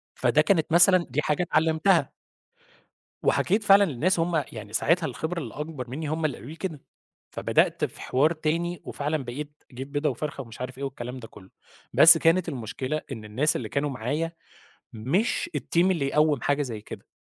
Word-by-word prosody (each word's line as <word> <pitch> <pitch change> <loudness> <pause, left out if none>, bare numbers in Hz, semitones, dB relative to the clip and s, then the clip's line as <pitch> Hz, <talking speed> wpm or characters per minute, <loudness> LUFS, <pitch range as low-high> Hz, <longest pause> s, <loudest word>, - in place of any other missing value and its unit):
فده - - +3
كانت 165 -6 +1
مثلًا 175 +1 +5
دي 150 +4 0
حاجة 150 +3 0
اتعلِّمتها. 160 -1 +2 1.1
وحكيت 210 +4 +2
فعلًا 200 0 +7
للناس 165 +4 0
وهُم 165 -2 +1
يعني 110 -2 -9
ساعتها 165 +8 +2
الخبرة 170 +2 -4
اللي 120 -7 -7
أكبر 150 -5 -6
منّي 150 +4 -4
هم 160 +1 -2
اللي 140 -5 0
قالوا 120 +8 -10
لي 160 - -9
كده. 165 -5 -5 0.5
فبدأت - - +1
في - - -6
حوار 145 +6 +2
تاني، 165 +2 -2
وفعلًا 145 -1 -3
بقيت 145 +5 -7
أجيب 130 +3 -8
بيضة 150 +1 0
وفرخة 145 +2 -5
ومش 115 -1 -13
عارف 130 0 -6
إيه 140 - -4
والكلام 125 -1 -6
ده 115 - -10
كُلّه. 95 -2 -16 0.4
بس 165 +1 +8
كانت 165 +2 +2
المشكلة 130 +2 -4
إن 110 -4 -7
الناس 130 +9 0
اللي - - -4
كانوا 145 +1 -1
معايا 145 +7 -2 0.6
مش 160 - -1
الteam 170 +1 +1
اللي 160 -7 0
يقوِّم 150 -2 +2
حاجة 145 +1 +1
زي 115 -5 -5
كده، 105 - -10
150 Hz, 180 wpm, -26 LUFS, 130-165 Hz, 1.1 s, بس